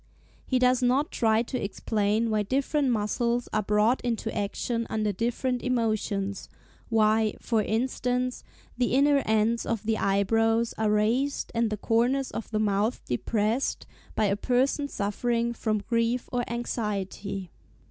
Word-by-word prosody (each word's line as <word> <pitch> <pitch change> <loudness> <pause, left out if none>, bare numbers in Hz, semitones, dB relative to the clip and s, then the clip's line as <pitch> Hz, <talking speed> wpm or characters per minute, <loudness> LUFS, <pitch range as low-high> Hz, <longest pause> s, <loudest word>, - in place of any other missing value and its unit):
He 260 - +2
does 250 0 +3
not 260 +4 +2
try 220 0 +2
to 250 +1 -4
explain 210 +2 0
why 215 -1 +2
different 275 +5 0
muscles 235 +2 0
are 215 - +2
brought 210 +4 +2
into 230 -2 -2
action 230 +3 -2
under 215 -1 0
different 245 +4 -1
emotions; 215 -5 -1 0.4
why, 220 -1 +3
for 225 -3 +1
instance, 250 +3 -1 0.3
the 245 0 +1
inner 280 +1 +4
ends 220 +2 +2
of 230 -2 -2
the 220 0 0
eyebrows 225 +4 +2
are 220 -1 0
raised, 230 +7 +1
and 230 -1 +1
the 215 - -3
corners 245 +5 +1
of 225 - -5
the 215 - -1
mouth 210 +2 0
depressed, 215 - -1 0.3
by 215 - +2
a 200 -1 +2
person 260 +6 +1
suffering 235 +2 -1
from 215 -2 -1
grief 230 +1 0
or 245 -1 0
anxiety. 200 -5 -3
225 Hz, 140 wpm, -27 LUFS, 210-245 Hz, 0.4 s, inner